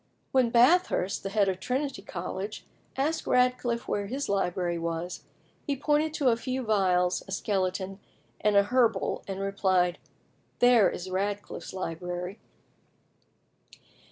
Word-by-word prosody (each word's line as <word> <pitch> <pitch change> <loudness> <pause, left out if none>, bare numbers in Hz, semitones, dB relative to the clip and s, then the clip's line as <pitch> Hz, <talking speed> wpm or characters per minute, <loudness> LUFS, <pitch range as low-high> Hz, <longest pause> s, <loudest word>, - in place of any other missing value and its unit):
When 255 -3 +3
Bathurst, 245 - +3
the 195 - -4
head 200 0 +2
of 190 -1 -1
Trinity 260 +1 -2
College, 195 +2 -5 0.3
asked 305 +4 -1
Radcliffe 250 -1 +1
where 205 -1 -1
his 270 +6 -3
library 180 -3 0
was, 170 +1 -4 0.4
he 285 - +1
pointed 295 +3 +1
to 275 -4 +3
a 230 - +4
few 255 +2 -3
vials, 185 -5 +2
a - - -9
skeleton, 190 -1 -1 0.4
and 210 -1 +2
a 200 - +7
herbal, 230 -2 +1
and 195 0 -4
replied, 185 -3 +1 0.6
"There 245 -4 +6
is 185 +1 -6
Radcliffe's 200 +2 -3
library." 180 +2 -5
200 Hz, 130 wpm, -28 LUFS, 185-250 Hz, 0.6 s, a